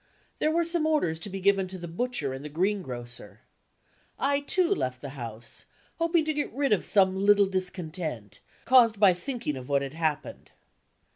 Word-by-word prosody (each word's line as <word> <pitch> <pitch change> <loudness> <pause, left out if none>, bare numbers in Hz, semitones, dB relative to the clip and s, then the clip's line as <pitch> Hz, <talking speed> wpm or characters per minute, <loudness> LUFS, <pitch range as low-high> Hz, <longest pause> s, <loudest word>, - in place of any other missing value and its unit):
There 305 - +2
were 335 +2 +2
some 335 -1 0
orders 180 - +1
to 185 - -5
be 195 0 -5
given 195 0 +2
to 185 +1 -8
the 175 -1 -7
butcher 170 - -2
and 135 +1 -7
the 150 - -6
green 190 +7 0
grocer. 120 -6 -9 0.8
I, 280 +1 +1
too, 360 +6 +1
left 130 - -1
the 140 - -7
house, 120 -4 -8 0.3
hoping 335 -1 +2
to 310 - 0
get 295 0 -2
rid 275 -2 +1
of 205 - 0
some 190 -2 +4
little 200 +1 +5
discontent, 175 - -4 0.3
caused 230 -4 +5
by 200 -3 +6
thinking 235 - -4
of 130 0 -8
what 140 -1 +2
had 135 0 -6
happened. 160 -2 -3
190 Hz, 185 wpm, -27 LUFS, -, 0.8 s, by